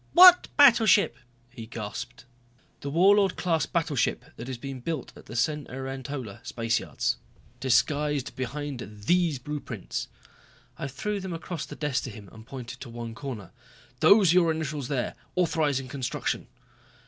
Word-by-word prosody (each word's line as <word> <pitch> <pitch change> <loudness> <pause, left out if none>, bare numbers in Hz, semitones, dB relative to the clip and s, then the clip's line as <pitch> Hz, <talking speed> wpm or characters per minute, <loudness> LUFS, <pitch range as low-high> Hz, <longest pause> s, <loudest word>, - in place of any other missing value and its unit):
"What 360 0 +9
battleship!" 230 -8 +6 0.4
he 115 -1 -9
gasped. 115 +2 -6 0.5
"The 140 - -5
Warlord 195 +5 +5
class 165 -3 0
battleship 155 -7 0
that 120 +3 -7
is 130 - -4
being 135 +1 -6
built 150 +1 -4
at - - -14
the 115 - -8
Cenerentola 135 -3 -3
Spaceyards. 115 -1 -1 0.4
Disguised 145 +2 +1
behind 140 +1 -4 0.3
these 175 -3 +3
blueprints." 150 +3 -5 0.7
I 140 - -2
threw 205 +10 -3
them 190 -2 -5
across 165 -1 -5
the - - -8
desk 145 -3 -1
to - - -5
him, 105 -3 -11
and 110 0 -14
pointed 130 -1 -8
to 130 - -8
one 115 -1 -6
corner. 115 -5 -7 0.5
"Those 190 - +6
are 180 - +4
your 170 -2 +5
initials 150 -4 -3
there, 130 -3 -1 0.2
authorizing 150 -7 +1
construction." 130 -1 -3
140 Hz, 140 wpm, -27 LUFS, 125-165 Hz, 0.7 s, What